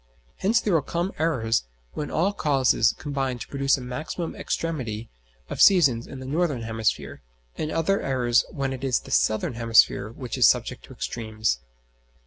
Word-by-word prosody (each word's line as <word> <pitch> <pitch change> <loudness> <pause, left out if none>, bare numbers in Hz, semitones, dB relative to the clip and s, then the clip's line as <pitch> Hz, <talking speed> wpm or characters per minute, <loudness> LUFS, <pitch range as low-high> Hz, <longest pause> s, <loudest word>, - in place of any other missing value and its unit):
Hence 215 +4 +2
there 205 - 0
will 160 - +4
come 170 +6 -2
eras 115 - +1 0.3
when 150 - -4
all 185 +6 +1
causes 135 - +3
combine 135 -4 -2
to 120 - -8
produce 140 0 +1
a - - -7
maximum 155 +7 -5
extremity 120 -9 -3 0.4
of - - -3
seasons 140 -12 +5
in 135 - -9
the 130 - -8
northern 145 -3 -1
hemisphere, 110 -1 -2 0.3
and 155 - -3
other 195 +5 +1
eras 125 -3 +2
when 135 -1 -3
it 130 0 -7
is 130 -3 +1
the - - -12
southern 110 +3 +1
hemisphere 115 -2 +3
which 120 +2 -6
is - - +8
subject - - -1
to - - -13
extremes. 110 - -2
135 Hz, 165 wpm, -25 LUFS, 115-155 Hz, 0.4 s, is